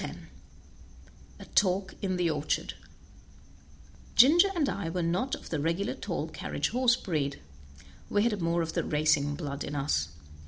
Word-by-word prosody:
10 - - -8 1.1
A - - -9
Talk 190 -1 +1
in 185 -2 -1
the 175 -1 +1
Orchard 150 -2 -1 1.4
Ginger 330 +10 +7
and 310 -5 +2
I 185 -9 -2
were 175 +1 -2
not 180 +11 0
of - - -12
the 160 - -1
regular 170 +7 0
tall - - -4
carriage - - -3
horse 250 -1 +3
breed, 145 - -2 0.7
we 205 - +2
had 215 -5 0
more 170 0 +1
of 165 - -5
the - - 0
racing 150 -1 +2
blood 145 -2 -4
in 145 - -5
us. 135 - 0
170 Hz, 155 wpm, -29 LUFS, 150-205 Hz, 1.4 s, Ginger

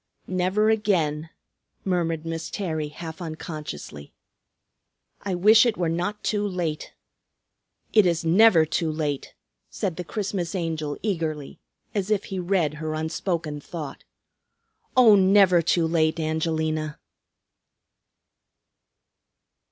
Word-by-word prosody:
"Never 185 +4 +1
again," 165 -8 0 0.6
murmured 165 -4 -1
Miss 165 0 -4
Terry 160 -7 -3
half 160 +3 -8
unconsciously. 155 - -7 1.1
"I 195 -2 -2
wish 215 +5 +6
it 235 -3 +1
were 175 -2 0
not 180 +5 -2
too 210 -1 0
late 170 -5 -4 0.5
" - - -48
"It 215 -4 +6
is 170 -1 0
never 175 -1 +6
too 160 +1 -1
late," 150 -3 -3 0.3
said 180 -4 -3
the 180 - -3
Christmas 195 -2 -3
Angel 160 -4 -3
eagerly, 160 -8 -3 0.3
as 200 -2 -2
if 210 -2 +1
he 190 - -2
read 175 -4 +1
her 155 0 -2
unspoken 160 -1 -3
thought. 155 -2 -7 0.9
"Oh, 240 -4 +8
never 190 -2 +5
too 165 +1 +2
late, 160 0 +1
Angelina." 155 -1 -1
165 Hz, 115 wpm, -25 LUFS, 155-190 Hz, 1.1 s, Oh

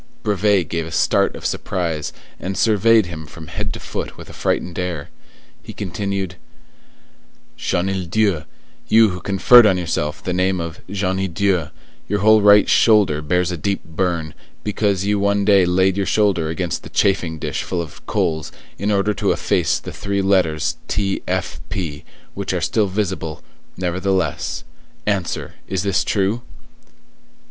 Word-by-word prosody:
Brevet 100 -4 +2
gave 85 -1 -3
a - - -8
start - - +2
of - - -9
surprise, 85 -5 -2 0.3
and 95 +1 -4
surveyed 110 0 +4
him 80 -3 -8
from 80 +1 -11
head - - -3
to - - -7
foot - - -5
with - - -11
a - - -10
frightened 90 0 -1
air. 85 -5 -4 0.5
He - - -10
continued:— 95 -1 -3 1.2
"Chenildieu, 95 -1 0 0.4
you 110 0 +6
who 90 -1 -6
conferred 110 +6 +6
on 95 -3 +3
yourself 80 -4 -2
the 90 - -2
name 95 0 +1
of 85 0 -5
'Jenie 95 -1 -1
Dieu,' 90 -3 0 0.4
your 100 0 0
whole 110 +1 +6
right 105 0 +6
shoulder 105 -9 +4
bears 90 +3 +1
a 90 - -3
deep 100 +5 -2
burn, 85 -2 -2 0.3
because 100 -2 0
you 105 0 +1
one 100 0 +1
day 100 -3 +5
laid 95 +2 +2
your 100 - 0
shoulder 95 -7 +2
against 85 +1 -2
the - - -11
chafing 90 -5 +1
dish - - -3
full 90 - -3
of 85 -4 -7
coals, 80 -2 -1 0.3
in 100 +1 0
order 100 +1 +2
to - - 0
efface - - +1
the - - -8
three 100 0 -2
letters 90 -6 +1
T. 100 -1 -1
F. - - -2
P., 75 -6 -4 0.3
which - - -3
are - - 0
still 105 -2 +1
visible, 95 -5 -3 0.3
nevertheless; 90 -2 -1 0.4
answer, 100 -4 -2
is 95 -3 -1
this 100 -2 +1
true?" 100 +3 0
95 Hz, 155 wpm, -20 LUFS, 85-100 Hz, 1.2 s, you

